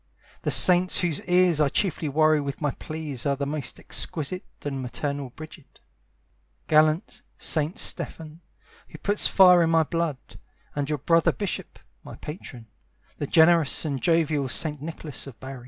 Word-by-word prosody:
The - - -2
saints 180 0 +5
whose 170 -5 -1
ears 180 -3 +3
I 145 - +3
chiefly 160 -2 -1
worry 155 +1 +3
with 140 -1 -5
my 145 -2 -1
pleas 155 -5 -6
are 140 - +1
the 140 +1 -3
most 140 -3 -5
exquisite 165 +4 0 0.2
and 135 -2 -3
maternal 140 +2 -4
Brigid, 155 +2 -14 0.9
Gallant 155 +4 +2 0.2
Saint 155 +2 0
Stephen, 160 +1 -4 0.5
who - - -12
puts 205 +1 +3
fire 180 -2 +6
in 165 - +2
my 165 -1 +3
blood, 160 -4 -4 0.4
And 145 0 -2
your 150 - -1
brother 165 +4 +2
bishop, 205 -3 -5 0.3
my - - -10
patron, 135 -7 -10 0.5
The 145 - -3
generous 165 -2 +4
and 140 -4 -3
jovial 155 -5 +1
Saint 150 +1 -1
Nicholas 155 -2 -7
of 130 - -12
Bari. 130 0 -8
155 Hz, 155 wpm, -25 LUFS, 140-165 Hz, 0.9 s, fire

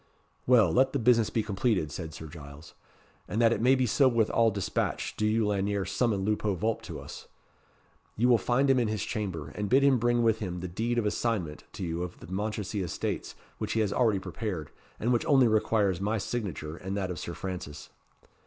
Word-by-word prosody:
"Well, 115 -9 +5
let 130 +9 +3
the - - +1
business 115 -2 +3
be 110 - 0
completed," 100 - 0
said 80 -2 -6
Sir 80 - -9
Giles; 75 -1 -11 0.5
"and 110 - -2
that 115 -1 +5
it - - -2
may 130 +3 +5
be 130 -1 +1
so 135 +4 +4
with 115 -4 +2
all 115 -1 +4
dispatch, 100 -2 -2
do 105 - 0
you, 110 +1 +2
Lanyere, 100 -1 0
summon 100 +1 0
Lupo 105 -1 0
Vulp 110 +4 -1
to - - -7
us. - - -10 0.9
You 120 +3 +3
will 120 -2 +5
find 125 +7 +2
him 135 -1 +4
in 120 - +1
his 105 -1 -2
chamber, 95 - -4
and 105 +6 -4
bid 135 +3 +5
him 135 -3 +4
bring 120 +1 +2
with 110 -1 +2
him 90 -4 -4
the 90 - -4
deed 115 +7 -2
of 115 - +1
assignment 105 - -2
to - - -6
you 85 0 -2
of 90 0 -6
the - - -11
Mounchensey 105 +1 -3
estates 85 - -3 0.2
which - - -2
he 115 - +2
has 100 -2 0
already 115 -5 +3
prepared, 95 - -5 0.3
and 120 +3 +1
which 120 - +1
only 135 -4 +5
requires 105 -4 +1
my 105 +3 0
signature 95 - -4
and 95 +3 -5
that 95 -2 -2
of 85 - -5
Sir 85 - -6
Francis." 90 -6 -6
105 Hz, 210 wpm, -29 LUFS, 90-115 Hz, 0.9 s, Well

